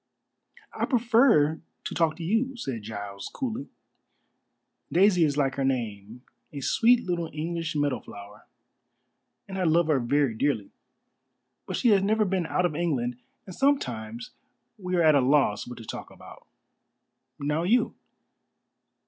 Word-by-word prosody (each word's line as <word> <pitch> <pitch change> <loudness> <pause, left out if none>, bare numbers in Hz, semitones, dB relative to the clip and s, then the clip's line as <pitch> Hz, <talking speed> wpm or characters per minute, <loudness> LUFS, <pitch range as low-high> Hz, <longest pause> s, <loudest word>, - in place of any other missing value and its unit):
"I - - -1
prefer 230 - +3 0.2
to - - -5
talk 165 -2 +1
to 170 - -8
you," 235 +9 0
said 130 - -4
Giles 100 -2 -7
coolly. 260 0 -4 1.2
"Daisy 180 -1 +4
is 145 -2 +1
like 135 -2 +1
her 135 - 0
name 115 -3 -3 0.3
a 145 - -6
sweet 235 - +3
little 170 -3 -2
English 165 +1 -3
meadow 145 -4 0
flower 100 0 -13 1.0
and 190 -1 -5
I - - 0
love 165 0 +3
her 145 -4 +3
very 135 +1 +1
dearly. 110 -3 -1 1.0
But - - -3
she 240 - +2
has 200 -3 +5
never 215 +2 +2
been 185 -3 -1
out 180 - +1
of 175 - 0
England, 130 -8 -1 0.3
and 185 - -9
sometimes 120 - -1 0.4
we 185 -4 -3
are 170 - +3
at 155 -1 +6
a 140 - +4
loss 130 -5 +2
what 125 - -8
to 115 - -10
talk - - -7
about. - - -15 0.9
Now 150 +3 -1
you?" 220 +9 +2
155 Hz, 150 wpm, -27 LUFS, 125-190 Hz, 1.2 s, at